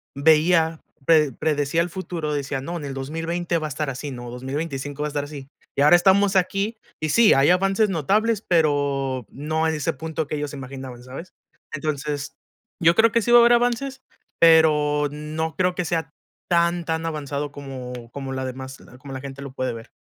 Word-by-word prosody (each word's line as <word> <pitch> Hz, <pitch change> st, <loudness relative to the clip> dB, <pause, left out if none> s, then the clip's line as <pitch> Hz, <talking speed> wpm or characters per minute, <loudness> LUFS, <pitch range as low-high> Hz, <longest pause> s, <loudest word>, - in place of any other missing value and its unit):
veía, 160 Hz, +2 st, +3 dB, 0.3 s
pre 155 Hz, -3 st, +4 dB
predecía 150 Hz, +3 st, 0 dB
el 175 Hz, -, -1 dB
futuro, 170 Hz, -4 st, -4 dB
decía: 140 Hz, -1 st, -2 dB
"No, 170 Hz, +6 st, -5 dB
en 150 Hz, -, -6 dB
el 140 Hz, -, -5 dB
2020 165 Hz, +5 st, -2 dB
va 155 Hz, -1 st, -3 dB
a -, -, -7 dB
estar 150 Hz, +1 st, -3 dB
así, 135 Hz, +2 st, -5 dB
¿no? 120 Hz, -1 st, -7 dB
2025 140 Hz, +3 st, -5 dB
va 150 Hz, -, 0 dB
a -, -, -4 dB
estar 145 Hz, -1 st, -2 dB
así". 145 Hz, -2 st, -9 dB, 0.3 s
Y -, -, +1 dB
ahora 150 Hz, +4 st, +7 dB
estamos 195 Hz, +2 st, +4 dB
aquí 195 Hz, +4 st, 0 dB, 0.3 s
y 155 Hz, -, -1 dB
sí, 230 Hz, +5 st, +6 dB
hay 135 Hz, +3 st, +4 dB
avances 195 Hz, +4 st, +3 dB
notables, 205 Hz, +6 st, +1 dB
pero 140 Hz, -6 st, +1 dB
no 155 Hz, +3 st, -1 dB
en 160 Hz, -, 0 dB
ese 150 Hz, -, -1 dB
punto 160 Hz, +1 st, -4 dB
que 150 Hz, -, -3 dB
ellos 145 Hz, -1 st, -3 dB
se -, -, -8 dB
imaginaban, 130 Hz, -2 st, -8 dB
¿sabes? 135 Hz, +8 st, -9 dB, 0.4 s
Entonces, 145 Hz, -1 st, -3 dB, 0.5 s
yo 170 Hz, 0 st, +5 dB
creo 225 Hz, +2 st, +5 dB
que 230 Hz, -, +2 dB
sí 240 Hz, -, 0 dB
va 240 Hz, -, +9 dB
a -, -, +8 dB
haber 235 Hz, +1 st, +6 dB
avances, 245 Hz, +3 st, 0 dB, 0.4 s
pero 150 Hz, -3 st, +5 dB
no 155 Hz, +2 st, -4 dB
creo 180 Hz, -1 st, +1 dB
que 180 Hz, -, -1 dB
sea 165 Hz, 0 st, -1 dB, 0.4 s
tan, 170 Hz, 0 st, +2 dB
tan 160 Hz, 0 st, -2 dB
avanzado 145 Hz, -2 st, -3 dB
como 125 Hz, -4 st, -8 dB
como 135 Hz, 0 st, -6 dB
la 130 Hz, 0 st, -3 dB
demás 130 Hz, +1 st, -7 dB, 0.2 s
como 135 Hz, +1 st, -9 dB
la 130 Hz, -, -5 dB
gente 140 Hz, 0 st, -8 dB
lo 140 Hz, -1 st, -7 dB
puede 130 Hz, -2 st, -2 dB
ver. 115 Hz, -1 st, -10 dB
150 Hz, 200 wpm, -23 LUFS, 140-170 Hz, 0.5 s, va